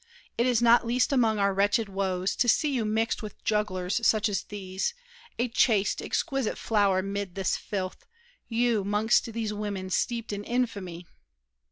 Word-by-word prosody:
It 235 - +1
is 240 -2 +2
not 235 0 +6
least 250 +4 +1
among 225 -5 +3
our 200 -1 +2
wretched 205 +3 +2
woes 190 -1 -1
To 245 - +2
see 295 +6 +3
you 240 -4 0
mixed 220 +3 0
with 215 -1 -9
jugglers 205 -1 0
such 215 -1 +3
as 200 - -1
these, 190 - -4 0.4
A 240 - +1
chaste, 225 -4 +2
exquisite 270 -5 -1
flower 200 -4 +2
'mid 200 -2 -4
this 195 -1 0
filth— 195 - -5 0.4
You, 230 -2 +1
'mongst 215 +3 +2
these 220 -2 -3
women 200 -3 -4
steeped 230 +1 -1
in 205 0 -4
infamy! 200 -8 -3
210 Hz, 160 wpm, -27 LUFS, 195-230 Hz, 0.4 s, not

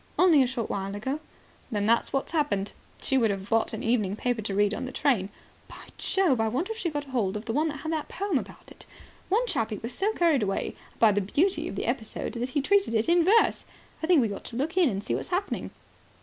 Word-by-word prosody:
"Only 340 -6 +6
a 255 - +3
short 245 -3 -3
while 195 0 -3
ago." 265 +8 -3 0.5
"Then 205 -4 -1
that's 230 +2 +2
what's 270 - -1
happened. 290 - 0 0.3
She 265 - +3
would 225 -3 +3
have 195 -1 -3
bought 225 0 +2
an - - -5
evening 215 -4 +1
paper 245 0 -1
to 200 -2 -3
read 205 +1 +3
in 260 - -3
the 260 - -6
train. 245 -10 +1 0.4
By - - -12
Jove, 335 -12 +2
I 225 - +2
wonder 270 - -1
if 445 - -5
she 350 - -1
got 290 -2 -3
hold 230 -8 -1
of 210 - -8
the 225 - -2
one 305 +5 +2
that 295 -3 -5
had 315 - -3
the 315 -2 -1
poem 380 -6 0
about - - -11
it. - - -12 0.4
One 445 +6 +2
chappie 220 - -1
was 230 +4 -5
so 405 +3 +1
carried 330 - +3
away 195 -2 -2 0.2
by 225 -2 +6
the 205 0 +1
beauty 320 - +1
of - - -6
the - - -3
episode 235 -3 -3
that 245 +1 -3
he 285 +2 0
treated 395 - +2
it 220 0 +2
in 340 0 +4
verse. 430 +6 +4 0.4
I 320 - -2
think 340 -5 +5
we 215 -3 -1
ought - - -9
to 230 - -8
look 300 +8 -2
in 360 -6 +4
and 200 -2 -3
see - - -2
what's - - -2
happening." 380 +2 -2
255 Hz, 250 wpm, -27 LUFS, 215-325 Hz, 0.5 s, Only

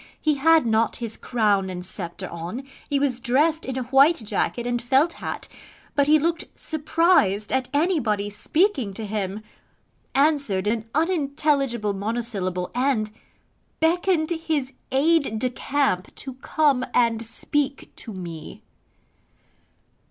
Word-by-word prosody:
He 310 - +2
had 315 +1 +4
not 225 0 +2
his 230 -2 -4
crown 205 -5 +1
and 180 -1 -5
sceptre 175 -2 -5
on: 170 +10 -6 0.3
he 285 - +2
was 275 -3 0
dressed 300 +7 +2
in 260 -1 -3
a 260 - -1
white 275 +6 +5
jacket 235 0 -2
and 240 -1 -1
felt 270 +7 +3
hat: - - -5 0.5
but 285 -1 +2
he 305 +1 +6
looked 330 +2 -1
surprised 310 - +2
at 260 -1 0
anybody 285 - +1
speaking 265 - 0
to 220 - -5
him: 205 0 -3 0.7
answered 275 -9 +2
an 220 +1 -1
unintelligible 280 - +1
monosyllable, 200 -4 -2
and 245 -4 +1 0.7
BECKONED 335 0 +2
HIS 315 -5 -1 0.2
AID 280 -3 +2
DE 250 +3 -1
CAMP 265 -8 -1
TO 265 - -6
COME 270 0 +1
AND 230 -2 +3
SPEAK 275 +5 -2
TO 230 - -7
ME. 170 -5 -8
255 Hz, 130 wpm, -24 LUFS, 215-300 Hz, 0.7 s, he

